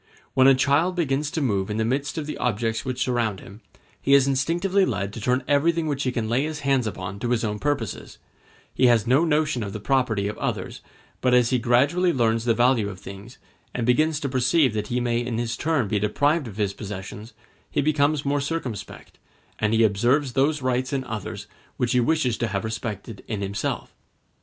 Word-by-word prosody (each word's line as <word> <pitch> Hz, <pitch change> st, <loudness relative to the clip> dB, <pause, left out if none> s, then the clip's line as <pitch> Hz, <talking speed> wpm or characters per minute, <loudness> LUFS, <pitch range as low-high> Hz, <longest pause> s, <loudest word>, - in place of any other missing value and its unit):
When 130 Hz, 0 st, +5 dB
a 135 Hz, -, +7 dB
child 145 Hz, +7 st, +2 dB
begins 145 Hz, -4 st, 0 dB
to 160 Hz, -, -3 dB
move 100 Hz, -7 st, 0 dB
in 105 Hz, -, -2 dB
the 110 Hz, -, +1 dB
midst 140 Hz, +6 st, -2 dB
of 155 Hz, -, -2 dB
the 150 Hz, -, -5 dB
objects 115 Hz, -1 st, -1 dB
which 130 Hz, -1 st, -2 dB
surround 115 Hz, -6 st, -1 dB
him, 100 Hz, +3 st, -13 dB, 0.4 s
he 140 Hz, -, +4 dB
is 140 Hz, -1 st, +5 dB
instinctively 175 Hz, +8 st, +1 dB
led 100 Hz, -, -2 dB
to 115 Hz, -, -7 dB
turn 125 Hz, +4 st, +1 dB
everything 160 Hz, +3 st, +2 dB
which 145 Hz, -3 st, -2 dB
he 130 Hz, -, 0 dB
can 115 Hz, -3 st, -2 dB
lay 120 Hz, +4 st, +1 dB
his 155 Hz, -1 st, -4 dB
hands 135 Hz, -4 st, +1 dB
upon 95 Hz, -1 st, -5 dB
to 120 Hz, -, -2 dB
his 120 Hz, -1 st, +1 dB
own 105 Hz, -1 st, -2 dB
purposes; 140 Hz, -7 st, -3 dB, 0.6 s
he 130 Hz, -, +4 dB
has 115 Hz, -3 st, +4 dB
no 130 Hz, +7 st, +4 dB
notion 155 Hz, -5 st, +1 dB
of 100 Hz, -2 st, -4 dB
the 110 Hz, -, -5 dB
property 110 Hz, -3 st, +1 dB
of 105 Hz, -, -5 dB
others; -, -, -3 dB, 0.4 s
but 125 Hz, -1 st, +3 dB
as 125 Hz, 0 st, +3 dB
he 125 Hz, -, +2 dB
gradually 140 Hz, +10 st, +3 dB
learns 115 Hz, -4 st, +1 dB
the 115 Hz, -2 st, +3 dB
value 120 Hz, -3 st, +3 dB
of 95 Hz, -3 st, -9 dB
things, 100 Hz, +6 st, -10 dB, 0.4 s
and 120 Hz, -, -1 dB
begins 150 Hz, +5 st, +2 dB
to 140 Hz, -, -1 dB
perceive 130 Hz, +1 st, +2 dB
that 105 Hz, -1 st, -2 dB
he 120 Hz, +2 st, -1 dB
may 120 Hz, -1 st, 0 dB
in 120 Hz, -2 st, -3 dB
his 120 Hz, 0 st, -2 dB
turn 155 Hz, -8 st, 0 dB
be 105 Hz, +1 st, 0 dB
deprived 145 Hz, +8 st, +1 dB
of 105 Hz, -2 st, -9 dB
his 100 Hz, -2 st, 0 dB
possessions, 105 Hz, +2 st, -8 dB, 0.4 s
he -, -, -1 dB
becomes 145 Hz, 0 st, +1 dB
more 140 Hz, 0 st, +1 dB
circumspect, 140 Hz, -7 st, -5 dB, 0.4 s
and 105 Hz, -1 st, +1 dB
he 115 Hz, 0 st, +4 dB
observes 120 Hz, +6 st, +2 dB
those 140 Hz, +2 st, +1 dB
rights 130 Hz, 0 st, 0 dB
in 135 Hz, -2 st, -1 dB
others 110 Hz, -4 st, -6 dB, 0.3 s
which 120 Hz, -, 0 dB
he 125 Hz, -, +3 dB
wishes 125 Hz, -2 st, +1 dB
to 120 Hz, -, 0 dB
have 100 Hz, -2 st, -2 dB
respected 110 Hz, -1 st, -5 dB
in 105 Hz, -3 st, -3 dB
himself. 100 Hz, +1 st, -3 dB
125 Hz, 210 wpm, -24 LUFS, 110-140 Hz, 0.6 s, a